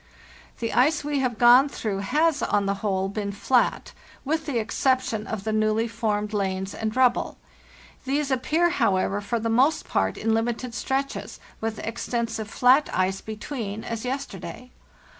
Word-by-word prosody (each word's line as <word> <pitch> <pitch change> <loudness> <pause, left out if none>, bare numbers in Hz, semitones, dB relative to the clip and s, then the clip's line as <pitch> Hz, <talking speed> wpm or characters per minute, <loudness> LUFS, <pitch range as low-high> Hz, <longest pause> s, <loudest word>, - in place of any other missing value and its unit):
"The 230 -1 -3
ice 290 +6 +3
we 290 -1 -1
have 250 -4 -1
gone 245 +4 +7
through 210 -7 -3
has, 300 +9 +1
on 205 -1 +1
the 200 - +1
whole, 190 -2 0
been 200 0 -3
flat, 240 +5 +1 0.3
with 315 +2 -1
the 275 -5 -1
exception 230 0 0
of 215 -3 -4
the 220 0 -2
newly 215 +1 +1
formed 215 -2 -2
lanes 190 -1 -2
and 220 -1 -3
rubble. 255 -2 +2 0.7
These 280 +1 0
appear, 315 +7 +2
however, 200 - +1
for 215 +3 -2
the 225 - -2
most 260 +7 +2
part 95 0 0
in 225 0 0
limited 235 +2 -1
stretches, 270 +5 -3 0.2
with 220 -1 -3
extensive 230 -1 -3
flat 255 +6 +4
ice 190 +1 0
between, 220 -1 -5
as 230 -1 -4
yes 270 +2 -2
terday. 195 +7 -9
230 Hz, 160 wpm, -25 LUFS, 210-260 Hz, 0.7 s, gone